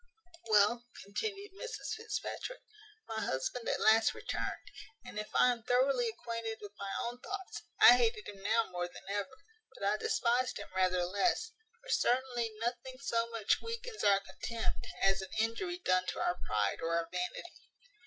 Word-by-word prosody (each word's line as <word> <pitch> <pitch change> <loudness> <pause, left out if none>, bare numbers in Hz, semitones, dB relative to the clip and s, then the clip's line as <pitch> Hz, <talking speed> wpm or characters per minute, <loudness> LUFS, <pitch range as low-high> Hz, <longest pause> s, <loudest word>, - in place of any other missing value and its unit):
"Well," 220 +3 +4 0.2
continued 395 - -4
Mrs 480 +5 -5
Fitzpatrick, 450 +3 -4 0.5
"my 220 -1 -3
husband 130 - -2
at - - +1
last 220 +1 +5
returned; - - -4 0.3
and, 245 -4 -6
if 210 - -5
I 250 - +6
am 240 -1 -3
thoroughly 250 +1 +3
acquainted 230 -1 -4
with 205 -1 -9
my 200 - -4
own 240 +1 -4
thoughts, 385 +6 -6 0.2
I - - +10
hated 450 -3 +1
him 195 -1 -9
now 225 +3 +2
more 175 0 -2
than 180 +2 -13
ever; 205 +7 -3 0.4
but - - -9
I 205 +2 +2
despised 245 +3 +1
him - - -7
rather 185 -1 +3
less: 200 - +1 0.3
for - - -13
certainly 245 -2 +2
nothing 245 +3 -3
so 235 -4 0
much 225 -3 +1
weakens 460 0 -5
our 200 -1 +5
contempt, 230 +3 -4 0.2
as 195 0 +4
an 190 - -7
injury 230 - 0
done 185 - +2
to - - -3
our 180 - 0
pride 105 -2 +1
or 165 0 0
our 165 0 -1
vanity. 180 - -5
230 Hz, 165 wpm, -33 LUFS, 200-260 Hz, 0.5 s, I